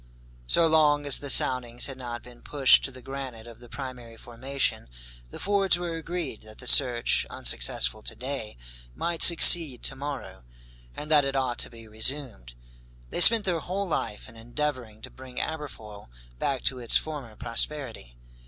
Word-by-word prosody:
So 165 - +5
long 150 -2 +2
as 145 - +3
the 140 - -7
soundings 125 -2 +3
had 135 - -6
not 120 -2 -8
been 120 -1 -17
pushed 140 -3 +3
to 135 - -5
the 130 -1 -14
granite 135 -4 -9
of 115 -1 -14
the 120 -1 -16
primary 125 -4 -10
formation, 130 - -4 0.4
the - - -11
Fords 195 -3 +1
were 175 -1 -5
agreed 165 -6 -6
that 110 0 -15
the 125 - -13
search, 125 -2 +2
unsuccessful - - 0
to - - -9
day, 130 - -7 0.4
might 170 -1 -4
succeed 165 -6 +7
to 135 - -2
morrow, 140 - -8 0.5
and 150 - -9
that 150 -2 +5
it 135 0 -4
ought 130 -3 -2
to - - -3
be 115 -1 -15
resumed. 110 - -2 0.6
They - - -2
spent 220 +2 +8
their 175 -3 -1
whole 190 +4 -5
life 105 -10 -5
in 115 - -16
endeavoring 120 -2 -6
to - - -10
bring 130 -1 -10
Aberfoyle 115 - -8 0.3
back 135 -2 -3
to 130 - -2
its 120 -2 +1
former 140 -8 -7
prosperity. 115 - -3
130 Hz, 170 wpm, -25 LUFS, 115-150 Hz, 0.6 s, spent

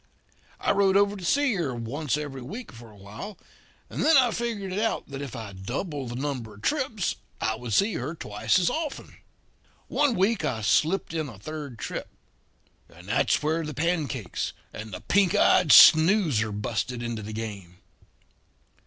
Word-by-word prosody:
I - - +1
rode 195 -1 +3
over 200 0 +3
to 190 - -9
see 280 +7 +2
her 160 -10 -2
once 135 +6 -2
every 145 -3 -6
week 215 - -8
for 115 -2 -13
a 105 - -17
while; 105 - -9 0.5
and - - -3
then 320 -1 +6
I 250 -3 +4
figured 220 -5 -3
it 195 - -1
out 225 +1 -1
that 140 0 -6
if 140 -4 -6
I 110 -4 -7
doubled 130 - -4
the 120 - -5
number 125 -5 -4
of 100 - -17
trips 260 - -1 0.2
I 110 - 0
would 115 +1 -7
see 200 - +3
her 145 +7 -4
twice 105 - 0
as 180 -2 +2
often. 310 -3 -4 0.7
"One 290 -5 +2
week 195 0 +1
I 125 -7 -1
slipped 160 - +1
in 155 -3 -2
a 110 - -11
third 145 +3 -7
trip; - - -5 0.8
and 90 +2 -15
that's 115 - +2
where 160 +2 0
the 150 -2 -6
pancakes 145 - -2 0.2
and 110 0 -8
the 90 - -7
pink 195 -3 +2
eyed 155 - +4
snoozer 160 - +7
busted 115 +4 -3
into 120 -2 -4
the 105 +1 -7
game. 100 -5 -7
145 Hz, 175 wpm, -26 LUFS, -, 0.8 s, snoozer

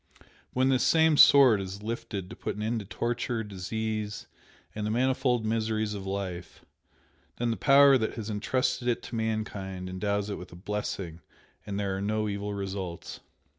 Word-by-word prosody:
But - - -23 0.3
when 130 +1 +2
this 130 -2 +3
same 160 -1 +4
'sword' 130 -8 +7
is 95 +2 -7
lifted 110 -4 -4
to - - -7
put - - -4
an 105 - -4
end 115 +1 0
to 105 - -7
torture, 120 +3 -2
disease, 105 +2 -4 0.5
and 105 - -4
the 105 - -1
manifold 125 0 +1
miseries 110 -1 0
of 100 -2 -6
life, 95 -3 -5 0.7
then 120 -1 0
the - - 0
Power 140 0 +6
that 110 - -2
has 110 -3 -5
entrusted 125 +4 -1
it 120 - 0
to - - -7
mankind 105 -4 -3
endows 100 +2 -1
it - - -4
with 90 +1 -12
blessing 95 -5 -4 0.5
and 100 0 -3
there 100 -2 -1
are 95 - -3
no 110 +1 0
evil 100 0 -3
results. 95 -3 -5
105 Hz, 170 wpm, -28 LUFS, 100-115 Hz, 0.7 s, sword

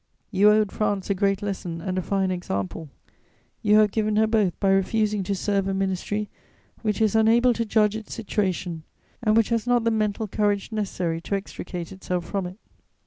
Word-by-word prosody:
You 200 +2 +5
owed 210 -1 +3
France 205 -2 -1
a - - +4
great 195 +1 0
lesson 185 -4 -4
and 185 +2 -3
a 185 - 0
fine 190 0 0
example; 155 - -4 0.7
you 210 -1 +4
have 215 -1 +5
given 215 -1 0
her 220 +1 +4
both 215 -5 +1
by 195 - +2
refusing 210 +2 +1
to 200 +1 -1
serve 195 0 0
a 195 - -1
ministry 195 +2 -1 0.5
which 215 -2 -1
is 220 -1 +2
unable 230 +3 +5
to 230 0 -2
judge 210 -1 +2
its 220 -1 -7
situation 190 -6 -2 0.4
and 215 -2 +3
which 225 - +3
has 230 0 0
not 245 -1 +3
the 230 - +2
mental 215 0 0
courage 205 +1 0
necessary 180 -6 -2
to 200 - -2
extricate 180 -3 -6
itself 180 -2 -3
from 190 +1 -2
it. 180 +2 -10
205 Hz, 190 wpm, -25 LUFS, 190-215 Hz, 0.7 s, You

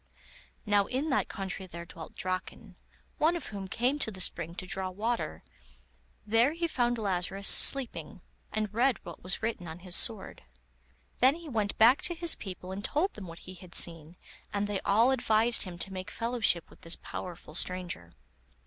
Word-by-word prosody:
Now 205 -2 +2
in 275 +4 -2
that 265 - +1
country 190 -1 -5
there 170 -1 -9
dwelt 165 -1 -11
Draken, 185 0 -5 0.4
one 325 +3 +3
of 335 - -5
whom 200 -2 -6
came 250 +8 -1
to 250 - 0
the 190 -3 -9
spring 170 -2 -2
to 185 - -7
draw 190 0 -3
water; 225 +6 -3 0.8
there 230 +7 +3
he 335 +1 -2
found 240 -5 0
Lazarus 195 -1 0
sleeping, 215 - +6 0.3
and 215 -1 -3
read 250 +3 +2
what 170 - -10
was 185 +4 -2
written 220 -6 -3
on 160 +1 -7
his 180 0 -2
sword. 220 -5 +2 0.8
Then 260 +3 +5
he 335 -1 -11
went 215 -5 -2
back 235 +5 +6
to 345 - 0
his 335 0 +3
people 185 -1 -8
and 195 +2 -6
told 330 - 0
them 200 -3 -9
what 165 0 -11
he 185 - -9
had 180 -1 -10
seen, 165 -1 +5 0.4
and 205 0 -1
they 205 -1 -2
all 225 +6 +3
advised 230 -3 +3
him 180 -2 -8
to 190 +2 -4
make 185 0 -6
fellowship 230 -7 0
with - - -19
this 165 - -5
powerful 175 -4 -8
stranger. 175 - -3
200 Hz, 180 wpm, -29 LUFS, 180-240 Hz, 0.8 s, sleeping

